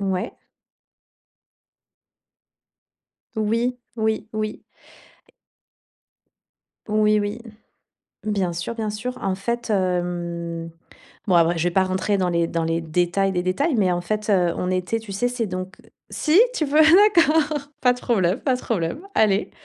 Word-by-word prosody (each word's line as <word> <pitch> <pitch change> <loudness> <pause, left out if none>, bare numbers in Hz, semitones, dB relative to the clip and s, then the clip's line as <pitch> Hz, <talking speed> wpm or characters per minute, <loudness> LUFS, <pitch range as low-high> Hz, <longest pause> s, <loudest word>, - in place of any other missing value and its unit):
Ouais. 190 -2 -2 3.0
Oui, 230 +3 0 0.2
oui, 220 -1 -1
oui. 215 0 -4 2.3
Oui 215 0 +3
oui. 205 +2 -3 0.9
Bien 195 -4 0
sûr, 175 +7 -4
bien 220 -2 -3
sûr. 230 +5 -5
En 195 -1 0
fait, 235 +5 -3
hem, 175 -3 -2 0.6
bon 185 - +2
après 170 0 +4
je 165 - -1
vais 175 - +2
pas 190 +2 +2
rentrer 190 +2 0
dans 185 - +1
les 170 -1 +1
dans 165 -1 -2
les 165 +1 0
détails 175 +4 0
des 180 -1 -1
détails. 265 - 0
Mais 190 -4 +2
en 175 - -1
fait, 210 +4 -3
heu, 180 -4 +3
on 180 - -2
était 185 +5 -1
tu 220 -2 -11
sais, 245 +6 0
c'est 245 -2 -2
donc 185 +1 -6 0.3
si? 310 +3 +2 0.2
Tu 310 - 0
veux? 295 +2 +3
D'accord, 320 -4 +5 0.2
pas 250 -1 +4
de 250 - -11
problème, 195 -4 +1
pas 260 -3 +1
de 250 - -4
problème. 180 - -2
Allez. 210 -2 +2
200 Hz, 145 wpm, -22 LUFS, 180-235 Hz, 3.0 s, D'accord